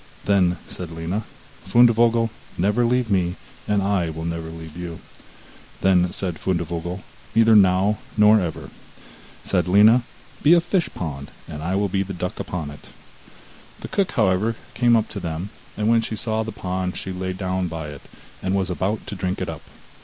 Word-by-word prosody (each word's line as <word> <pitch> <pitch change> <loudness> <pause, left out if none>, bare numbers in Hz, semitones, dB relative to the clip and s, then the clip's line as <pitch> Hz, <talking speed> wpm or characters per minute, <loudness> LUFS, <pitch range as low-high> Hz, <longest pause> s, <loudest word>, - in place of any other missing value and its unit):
Then 90 -3 +3
said 90 -3 -6
Lina: 85 +6 -3 0.4
'Fundevogel, 115 -1 +4 0.3
never 105 +7 +2
leave 125 -2 +1
me, 90 -2 +1 0.3
and 105 -1 +2
I 95 -4 +1
will 80 +1 -5
never 85 -1 -3
leave 80 -1 -9
you.' 85 -2 -6 0.8
Then 90 -2 +4
said 90 -4 -4
Fundevogel: 85 0 -2 0.3
'Neither 115 -1 +6
now, 95 +1 +4 0.2
nor 105 +1 +7
ever.' 85 -3 -5 0.7
Said 90 -2 0
Lina: 105 +6 +6 0.4
'Be 160 +4 +7
a - - +6
fishpond, 90 - -2 0.2
and 75 - -7
I 90 +4 -1
will 100 +1 +1
be 95 +1 0
the 95 0 -4
duck 90 +1 -4
upon 80 -5 -4
it.' 75 - -13 0.9
The - - -7
cook, 195 -2 0
however, 110 0 +2 0.2
came 120 -1 +4
up 110 -1 +2
to 105 - -5
them, 85 +2 -4 0.3
and 105 0 0
when 115 0 +4
she 110 - -4
saw 110 +1 -1
the 110 0 -4
pond 90 -1 -3
she 95 - -4
lay 95 0 -3
down 95 -1 -2
by 80 -2 -5
it, 70 -2 -9 0.4
and 95 +1 0
was 95 -2 0
about 100 +4 -2
to - - -6
drink 95 -1 -2
it - - -3
up. - - -6
95 Hz, 175 wpm, -23 LUFS, 85-110 Hz, 0.9 s, nor